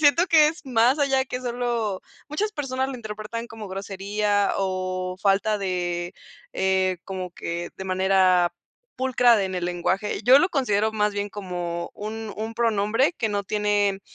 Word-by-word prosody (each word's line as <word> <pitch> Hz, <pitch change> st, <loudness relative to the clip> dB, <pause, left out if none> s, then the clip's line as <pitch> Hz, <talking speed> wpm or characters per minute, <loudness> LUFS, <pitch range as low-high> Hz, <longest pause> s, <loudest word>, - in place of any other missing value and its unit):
siento 310 Hz, +4 st, +5 dB
que 315 Hz, -3 st, +6 dB
es 320 Hz, +2 st, -5 dB
más 250 Hz, +2 st, +3 dB
allá 270 Hz, -2 st, +2 dB
que 250 Hz, -1 st, -5 dB
solo 235 Hz, -5 st, -2 dB, 0.3 s
muchas 420 Hz, +9 st, -2 dB
personas 265 Hz, -5 st, -2 dB
lo 270 Hz, -, -5 dB
interpretan 220 Hz, +1 st, -6 dB
como 220 Hz, -2 st, -9 dB
grosería 200 Hz, +1 st, -1 dB
o 185 Hz, -1 st, -2 dB
falta 200 Hz, +2 st, +2 dB
de, 175 Hz, -2 st, -2 dB, 0.4 s
eh, 190 Hz, -1 st, +1 dB
como 185 Hz, -2 st, -5 dB
que 170 Hz, 0 st, -5 dB
de 190 Hz, -, -6 dB
manera 185 Hz, -1 st, +3 dB, 0.4 s
pulcra 250 Hz, -2 st, +4 dB
de, 200 Hz, -, +1 dB
en 190 Hz, -, -5 dB
el 180 Hz, -1 st, -2 dB
lenguaje. 180 Hz, +4 st, -1 dB
Yo 255 Hz, +3 st, +8 dB
lo 350 Hz, +6 st, +2 dB
considero 220 Hz, -, +1 dB
más 210 Hz, -1 st, 0 dB
bien 205 Hz, 0 st, -2 dB
como 175 Hz, -4 st, -4 dB
un 220 Hz, +1 st, -6 dB
un 220 Hz, +1 st, -4 dB
pronombre 225 Hz, +5 st, +1 dB
que 220 Hz, -8 st, -1 dB
no 205 Hz, -1 st, -1 dB
tiene 205 Hz, -1 st, +1 dB
210 Hz, 160 wpm, -24 LUFS, 190-240 Hz, 0.4 s, Yo